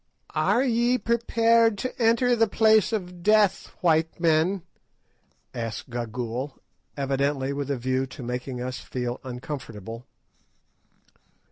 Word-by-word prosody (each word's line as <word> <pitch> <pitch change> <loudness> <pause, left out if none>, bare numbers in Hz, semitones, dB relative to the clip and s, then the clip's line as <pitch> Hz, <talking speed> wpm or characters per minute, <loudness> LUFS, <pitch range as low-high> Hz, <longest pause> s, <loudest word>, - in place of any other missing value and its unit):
"Are 250 - +2
ye 240 0 +2
prepared 230 -1 +3
to 255 +3 -4
enter 235 +2 +4
the 225 -1 +3
Place 220 0 +4
of 180 -5 -4
Death, 210 0 +3
white 160 -1 +2
men?" 165 +3 +2 0.9
asked 115 +1 -5
Gagool, 120 +3 -4 0.4
evidently 140 0 0
with 140 0 -4
a 140 - 0
view 130 +2 -1
to 130 0 -10
making 125 +1 -4
us 125 0 -4
feel 125 -1 -4
uncomfortable. 125 -4 -7
145 Hz, 115 wpm, -26 LUFS, -, 0.9 s, enter